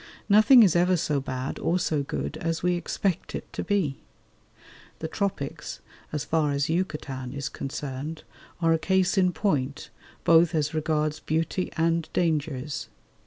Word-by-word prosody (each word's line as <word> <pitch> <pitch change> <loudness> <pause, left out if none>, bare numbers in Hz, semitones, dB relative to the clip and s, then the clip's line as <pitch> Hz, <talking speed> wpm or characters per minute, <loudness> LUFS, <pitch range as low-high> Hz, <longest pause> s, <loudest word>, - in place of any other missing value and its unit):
Nothing 220 +4 +8
is 185 -6 +4
ever 180 +1 +4
so 150 -3 0
bad 130 0 -4
or 170 +3 +1
so 155 -4 0
good 70 - -4
as 165 0 -2
we 180 0 +3
expect 175 +1 -2
it - - -7
to - - -3
be. 185 -10 0 1.0
The 160 - -4
Tropics, 160 -5 -3 0.3
as 150 -2 -3
far 155 -2 +1
as 140 +1 0
Yucatan 150 -7 -3
is 140 -1 -3
concerned, 140 +3 -5 0.4
are 165 0 +5
a 165 - +1
case 190 +3 +2
in 185 -2 +3
point, 150 -7 -1 0.3
both 165 0 +5
as 150 -1 0
regards 155 -1 0
beauty 165 +4 -1
and 165 0 +1
dangers. 150 -4 -1
160 Hz, 150 wpm, -26 LUFS, 145-175 Hz, 1.0 s, Nothing